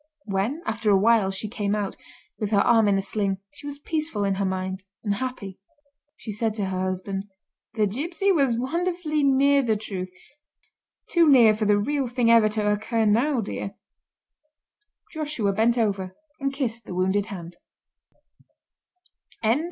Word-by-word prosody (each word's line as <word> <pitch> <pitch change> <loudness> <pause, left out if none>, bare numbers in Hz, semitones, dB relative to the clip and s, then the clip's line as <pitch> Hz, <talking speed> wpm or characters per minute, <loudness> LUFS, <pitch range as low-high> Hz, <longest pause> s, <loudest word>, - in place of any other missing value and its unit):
When, 215 - -2
after 220 -1 -1
a 200 - +6
while, 215 -1 +4
she 195 +3 -4
came 205 -1 -1
out, 205 -2 -3 0.4
with 210 - -2
her 205 -2 +3
arm 225 -1 +4
in 200 -1 +3
a 195 - -1
sling, 195 -2 -1 0.2
she 290 0 -10
was 285 0 -6
peaceful 305 -7 -2
in 195 -1 +1
her - - +1
mind 190 0 -3 0.2
and 205 -2 0
happy. 205 -4 -5 0.6
She 220 - -7
said 215 +1 -1
to 205 -3 -1
her 190 -1 -3
husband: 190 +1 -3 0.5
"The 215 -2 +2
gipsy 335 - 0
was 275 -9 +2
wonderfully 330 +3 -1
near 280 +1 +4
the 225 -4 +1
truth; 190 -3 -5 1.0
too 335 -3 +5
near 235 -6 +7
for 215 0 -1
the 205 0 +4
real 275 +5 0
thing 240 -1 +2
ever 225 -2 +6
to 210 -1 0
occur 220 +2 0
now, 240 +5 +2
dear." 200 -1 -5 1.4
Joshua 295 - -1
bent 230 +4 +2
over 195 -5 -1 0.2
and 275 -1 -1
kissed 240 -5 -3
the 180 - -7
wounded 190 +3 +1
hand. 175 -3 -8
220 Hz, 160 wpm, -25 LUFS, 200-265 Hz, 1.4 s, near